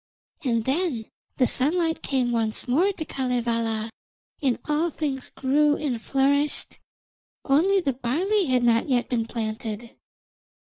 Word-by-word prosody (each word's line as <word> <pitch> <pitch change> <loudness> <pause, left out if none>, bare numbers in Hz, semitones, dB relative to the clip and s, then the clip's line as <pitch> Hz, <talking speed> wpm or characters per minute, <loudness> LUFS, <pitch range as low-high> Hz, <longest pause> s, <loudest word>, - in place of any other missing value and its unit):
And 230 -4 0
then 270 -5 0 0.3
the 255 - +4
sunlight 320 +6 +1
came 255 -3 0
once 225 -1 -1
more 335 +11 +3
to 335 -5 -6
Kalevala, 230 -4 -1 0.5
and 260 -4 +1
all 305 +3 +1
things 280 -4 -3
grew 290 +2 +2
and 255 -7 -2
flourished, 280 +4 +1 0.7
only 365 +8 +3
the 275 -6 0
barley 345 - 0
had 255 -2 +2
not 230 +2 +3
yet 250 -2 +1
been 230 -3 0
planted. 220 0 -5
260 Hz, 130 wpm, -25 LUFS, 235-300 Hz, 0.7 s, the